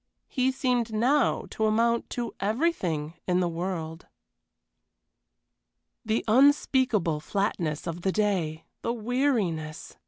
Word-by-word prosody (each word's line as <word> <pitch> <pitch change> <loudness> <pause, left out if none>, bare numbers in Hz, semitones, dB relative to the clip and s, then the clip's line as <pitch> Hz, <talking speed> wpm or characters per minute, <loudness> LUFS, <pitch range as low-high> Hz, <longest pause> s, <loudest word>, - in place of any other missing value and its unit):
he 260 -1 +1
seemed 250 -3 0
now 250 +5 +2
to 220 - 0
amount 235 +2 +1
to 240 -1 -4
everything 195 - 0
in 180 0 +2
the 180 - +2
world. 165 -1 -4 2.0
The 220 0 -1
unspeakable 250 - +3
flatness 170 -4 -2
of 170 +1 -4
the 190 - +1
day! 185 -7 -1 0.2
The 235 - -1
weariness! 220 - -1
215 Hz, 105 wpm, -27 LUFS, 170-245 Hz, 2.0 s, unspeakable